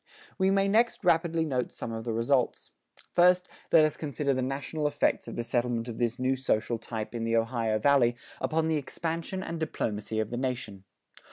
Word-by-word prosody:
We 190 0 +4
may 195 0 +3
next 225 +3 +2
rapidly 165 -1 +3
note 130 -5 -1
some 115 - -6
of 115 0 -5
the 120 - -1
results. 120 +3 0 0.4
First, 180 +1 +5 0.2
let 160 -2 +7
us 155 - -1
consider 145 -2 -1
the 130 - -1
national 140 +4 -2
effects 145 0 0
of - - -6
the 120 - -2
settlement 120 -1 -1
of 115 - -6
this 120 0 0
new 130 +1 +1
social 120 -3 0
type 110 -1 -5
in 115 -1 -3
the 115 0 +2
Ohio 115 -1 0
Valley 120 0 +4 0.2
upon 160 0 0
the 160 -1 +1
expansion 165 +5 -4
and 165 - -5
diplomacy 110 -8 -2
of 110 0 -2
the 120 - -2
nation. 120 -7 -3
130 Hz, 190 wpm, -29 LUFS, 115-160 Hz, 0.4 s, let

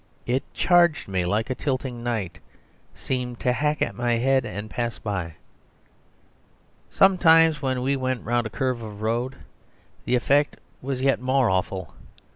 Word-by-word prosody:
It 125 +2 0
charged 175 -3 +3
me 90 -3 -1
like 110 +7 0
a - - +2
tilting 130 -3 -3
knight, 110 -7 -3 0.6
seemed 125 -2 -4
to 125 - +2
hack 150 +3 0
at - - -2
my 120 0 0
head, 130 +2 +2
and 105 +1 -6
pass 120 +1 -3
by. 95 -6 -4 1.5
Sometimes 165 -5 +5
when 130 -2 -1
we 140 +2 +1
went 130 -3 -2
round 120 0 0
a - - -9
curve 130 0 -2
of 105 -1 -8
road, 120 +4 -1 0.7
the 125 - +2
effect 140 +4 +2 0.2
was 130 0 -3
yet 135 -2 +2
more 130 -3 +2
awful. 95 -5 -2
125 Hz, 150 wpm, -24 LUFS, 110-135 Hz, 1.5 s, Sometimes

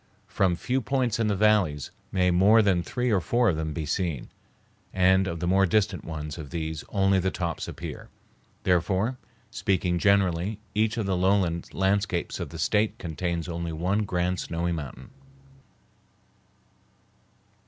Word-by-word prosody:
From 95 -3 +1
few 130 +8 -1
points 125 -4 0
in 115 - +2
the 105 - +1
valleys 95 -9 +2 0.2
may 90 -1 +2
more 100 +5 +5
than 95 -4 +2
three 125 +6 -1
or 100 - +3
four 120 +7 +2
of 85 - +1
them 80 0 -3
be 75 +1 -4
seen, 80 -3 -2 0.6
and 95 +1 +3
of 85 -2 -4
the 85 - -2
more 95 +2 +3
distant 95 -3 +1
ones 75 0 -6
of 75 -3 -7
these 80 -1 -4
only 95 -1 +2
the 95 +1 +1
tops 85 -3 -3
appear. - - -7 0.5
Therefore, 95 +7 +1 0.3
speaking 90 -2 0
generally, 100 0 +2
each 110 +2 +1
of 110 - -1
the 95 -1 0
lowland 90 -2 +1
landscapes 95 -2 0
of - - -4
the - - -8
State 105 +1 +1
contains 85 0 -3
only 85 -1 -4
one 90 +6 0
grand 90 -1 -1
snowy 85 +1 -2
mountain. 70 -6 -6
95 Hz, 155 wpm, -26 LUFS, 85-100 Hz, 0.6 s, more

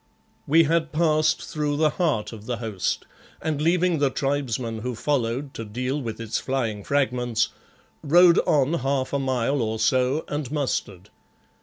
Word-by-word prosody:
We 165 +3 +6
had 165 0 +1
passed 155 -1 +2
through 150 -3 -2
the 155 -1 +3
heart 150 - -1
of 110 -1 -11
the 120 -2 -2
host, 110 -5 -2 0.3
and 155 -2 -2
leaving 175 0 +2
the 140 -1 +3
tribesmen 130 -5 -2
who 125 +2 -4
followed 130 +1 -1
to 115 - -6
deal 125 +7 -3
with 115 -3 -5
its 115 -1 -2
flying 115 -6 -2
fragments, 125 -4 0 0.5
rode 170 +3 +6
on 145 0 +3
half 135 -3 -1
a 140 - +1
mile 130 0 0
or 110 0 -1
so 130 +6 +2
and 145 -3 -4
mustered. 105 - -3
135 Hz, 155 wpm, -24 LUFS, 115-150 Hz, 0.5 s, We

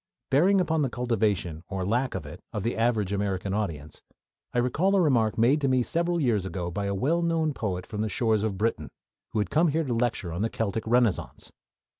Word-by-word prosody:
Bearing 185 +8 +4
upon 160 -3 +1
the 135 - +1
cultivation, 105 -10 -1
or 95 -2 -3
lack 120 +6 0
of - - -4
it, - - -10
of 105 - -3
the 115 - -1
average 110 -4 +1
American 100 -1 -1
audience, 80 -8 -4 0.5
I - - -3
recall 150 +11 +2
a - - +4
remark 120 - +2
made 130 +7 +3
to 140 - +2
me 130 -1 +3
several 170 +5 0
years 115 - +1
ago 90 -1 -4
by 100 +3 -2
a 100 - -1
well 155 - +1
known 165 -2 +1
poet 95 -8 -3
from 105 -2 -4
the 110 - -1
shores 110 -1 +1
of 105 -3 -2
Britain, 115 +4 -1 0.4
who - - -5
had 105 - 0
come 165 +3 +4
here 160 +2 +1
to 130 -5 -2
lecture 115 -7 -1
on 85 - -3
the 115 - +1
Celtic 110 0 -3
Renaissance. 120 -4 0
115 Hz, 215 wpm, -27 LUFS, 100-140 Hz, 0.5 s, Bearing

